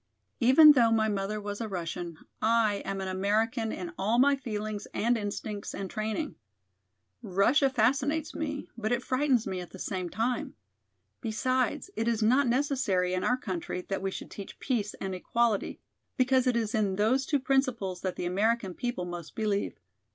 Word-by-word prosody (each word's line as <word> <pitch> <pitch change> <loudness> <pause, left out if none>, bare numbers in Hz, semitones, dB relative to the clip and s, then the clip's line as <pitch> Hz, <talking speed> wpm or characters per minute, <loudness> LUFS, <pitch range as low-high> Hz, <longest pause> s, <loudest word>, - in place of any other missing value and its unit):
Even 270 +6 +9
though 245 -5 +5
my 220 -1 +3
mother 205 0 -2
was 205 +1 -5
a 225 - -2
Russian, 175 -3 -5 0.2
I 220 -2 +2
am 195 0 -3
an 190 - -3
American 215 +4 0
in 175 -2 -5
all 215 +5 +2
my 280 +3 +5
feelings 215 -5 -4
and 235 +2 +2
instincts 205 -1 -4
and 195 -2 -5
training. 220 +8 -2 0.9
Russia 230 +7 +3
fascinates 270 +6 +1
me, 295 -2 -4
but 220 -1 -2
it 245 0 0
frightens 260 -3 +2
me 190 -2 -3
at 180 - -7
the - - -11
same 185 -1 -3
time. 235 +6 -2 0.7
Besides, 255 - -1
it 225 - -1
is 230 -2 +1
not 255 +5 +4
necessary 240 -9 +1
in 185 - -1
our 250 - +2
country 180 -6 -4
that 195 -1 -1
we 195 - -1
should - - -7
teach 200 - -8
peace 220 -6 -1
and 190 -1 -4
equality, 225 +3 0 0.4
because 260 0 +3
it 250 - +3
is 225 -2 -1
in 205 -4 +1
those 225 +7 +2
two 285 +2 +1
principles 255 -9 0
that 185 -1 -2
the - - -4
American 200 +2 +1
people 240 -3 -3
most 175 -2 -7
believe. 210 -2 -1
220 Hz, 175 wpm, -29 LUFS, 195-255 Hz, 0.9 s, Even